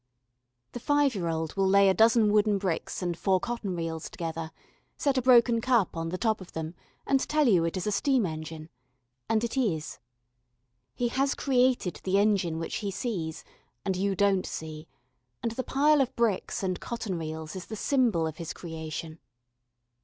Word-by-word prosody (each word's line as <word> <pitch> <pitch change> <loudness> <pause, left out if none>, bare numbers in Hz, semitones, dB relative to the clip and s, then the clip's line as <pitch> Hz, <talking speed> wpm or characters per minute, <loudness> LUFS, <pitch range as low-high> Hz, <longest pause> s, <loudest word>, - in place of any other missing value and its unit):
The 245 - -6
five 290 +1 +2
year 180 -5 -2
old 160 -1 -2
will 195 -1 +2
lay 200 +1 +5
a 190 - +5
dozen 220 0 +4
wooden 210 -1 +3
bricks 185 -1 -3
and 175 -1 -1
four 190 +2 +2
cotton 230 -4 -3
reels 165 -1 -4
together, 165 -1 -5 0.5
set 280 -2 +1
a 260 - +2
broken 235 -2 +5
cup 235 -8 +2
on 165 0 -3
the 185 - -3
top 220 0 0
of 185 - -12
them, 160 0 -4 0.3
and 275 - +3
tell 305 -2 +3
you 185 -7 +4
it 165 +3 -2
is 180 - -3
a 210 - 0
steam 250 +2 +2
engine. 155 -1 -6 0.6
And 225 0 +2
it 235 - -2
is. 175 - -1 1.0
He 240 - 0
has 270 +3 +1
created 250 -8 +1
the 190 +1 +1
engine 200 -5 +2
which 165 - -3
he 205 - -3
sees, 185 -6 -4 0.4
and 190 -1 0
you 195 +1 0
don't 195 -1 +2
see, 155 0 -7 0.6
and 230 - 0
the 255 +3 -3
pile 295 +3 +3
of 260 - -1
bricks 225 -4 0
and 185 -1 -1
cotton 215 -7 -4
reels 160 0 -6
is 185 - -7
the 220 - -5
symbol 230 - +2
of 160 -1 -4
his 165 -1 -5
creation. 160 -1 -7
195 Hz, 185 wpm, -28 LUFS, 165-235 Hz, 1.0 s, lay